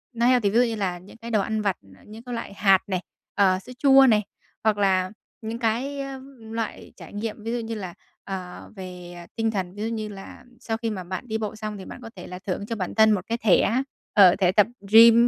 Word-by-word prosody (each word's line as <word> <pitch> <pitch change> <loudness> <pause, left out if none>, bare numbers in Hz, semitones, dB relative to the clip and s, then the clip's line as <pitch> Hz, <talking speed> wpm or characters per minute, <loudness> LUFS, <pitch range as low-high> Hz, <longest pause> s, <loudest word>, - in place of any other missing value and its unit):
nó 235 +1 +1
healthy 245 -5 +4
ví 215 - -4
dụ - - +6
như 230 -1 -2
là 190 -4 -2
những 190 +5 -15
cái 230 0 -8
đồ 210 -2 +3
ăn 220 +2 -1
vặt, 200 -3 0 0.3
những 220 +2 -11
cái 245 - -6
loại 230 - -6
hạt 195 -1 +5
này, 185 -2 -1 0.3
ờ, 185 -2 +4
sữa 195 - -12
chua 270 0 +7
này, 215 -2 +4 0.4
hoặc 215 -1 +3
là 190 -2 +2 0.3
những 225 +1 -5
cái 250 +5 -1 0.4
loại 225 0 -5
trải - - -12
nghiệm 215 +1 -5
ví 230 - -3
dụ 240 - -1
như 225 0 -4
là, 185 -5 -6 0.3
ờ, 185 -2 -7
về 180 -2 -9 0.2
tinh 225 -1 0
thần, 190 -3 -3
ví 205 - -7
dụ 225 - -1
như 220 -2 -3
là 200 +4 -10 0.2
sau 225 -1 -3
khi 230 0 -2
mà 195 -4 -4
bạn 185 +6 -6
đi 220 -1 -1
bộ 215 -1 -4
xong 215 -1 -5
thì 190 - -9
bạn - - -9
có 230 - -8
thể 180 - -9
là 180 - -7
thưởng 190 +1 -4
cho 230 - -3
bản 185 -4 -4
thân 220 0 +6
một 205 - +2
cái 230 +1 -1
thẻ, 225 +4 +3 0.3
ờ, 190 -3 +7
thẻ 185 -2 +3
tập 210 +2 +5 0.2
gym, 230 +1 +8
215 Hz, 245 wpm, -25 LUFS, 190-230 Hz, 0.4 s, gym